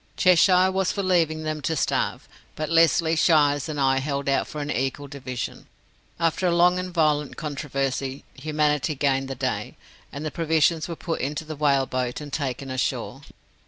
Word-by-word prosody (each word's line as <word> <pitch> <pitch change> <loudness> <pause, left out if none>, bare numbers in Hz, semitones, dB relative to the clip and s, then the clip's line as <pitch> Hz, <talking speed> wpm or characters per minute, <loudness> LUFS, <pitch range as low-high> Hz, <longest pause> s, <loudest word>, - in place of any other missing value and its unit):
Cheshire 185 +1 +5
was 190 -1 0
for 200 - -3
leaving 165 -4 +1
them 155 -1 -3
to 160 +3 -1
starve, 140 - -1 0.3
but 155 +1 -4
Lesly, 165 0 +4
Shiers, 145 -3 +3
and 150 -2 -4
I 135 -1 +3
held 140 0 -3
out 135 - +1
for 150 - -7
an 145 0 -3
equal 135 +2 -2
division. 130 -3 -6 0.5
After 165 +2 +1
a 170 - +2
long 180 +1 +4
and 185 0 -4
violent 150 -4 +1
controversy, 140 -3 -3
Humanity 150 +1 0
gained 135 -1 +1
the 135 - -5
day, - - -3 0.3
and 145 +3 -6
the 155 - -2
provisions 160 -1 +1
were 170 - -5
put 165 0 -4
into 145 +4 -3
the 155 0 -6
whale 140 -2 +2
boat, 125 -1 -3
and 145 -2 -9
taken 135 -2 -3
ashore. 130 - -2
150 Hz, 175 wpm, -24 LUFS, 135-165 Hz, 0.5 s, Cheshire